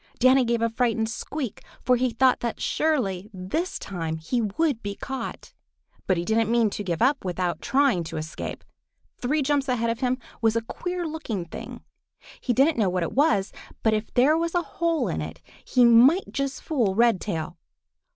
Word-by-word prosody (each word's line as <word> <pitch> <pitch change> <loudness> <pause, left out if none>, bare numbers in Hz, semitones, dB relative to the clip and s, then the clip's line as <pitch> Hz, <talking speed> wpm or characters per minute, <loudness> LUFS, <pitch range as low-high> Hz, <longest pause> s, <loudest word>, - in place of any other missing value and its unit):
Danny 255 +1 +5
gave 235 -1 0
a 230 - +2
frightened 225 -2 0
squeak, 255 +1 -5 0.2
for 250 - +4
he 250 +1 +1
thought 255 +2 +3
that 235 -1 -3
surely 215 - 0
this 195 - -3
time 165 -4 -4
he 200 +10 -1
would 235 +4 0
be 200 -1 -4
caught. 265 +4 -6 0.5
But 185 - +2
he 170 - -2
didn't 220 +1 +1
mean 230 -3 +3
to 205 - -4
give 175 +1 -1
up 270 +2 +2
without 180 -1 -2
trying 265 -10 +2
to - - -6
escape. 155 +1 -6 0.6
Three 290 +4 0
jumps 280 -1 +1
ahead 235 -2 +1
of 230 - -4
him 255 -1 +1 0.2
was 225 -1 +3
a 230 - 0
queer 355 +8 -4
looking 275 - -4
thing. 170 - -8 0.6
He 250 - 0
didn't 270 +3 +3
know 200 -4 +3
what 180 -1 -1
it 165 - -3
was, 220 -9 +2 0.3
but 220 - +3
if 215 0 -2
there 270 +5 +5
was 335 +1 -1
a 350 - +2
hole 335 +1 -1
in - - -2
it - - -7 0.2
he 250 -2 +4
might 250 +10 +6
yet 275 0 0
fool 250 -8 -1
Redtail. 195 -7 +1
235 Hz, 185 wpm, -25 LUFS, 200-275 Hz, 0.6 s, might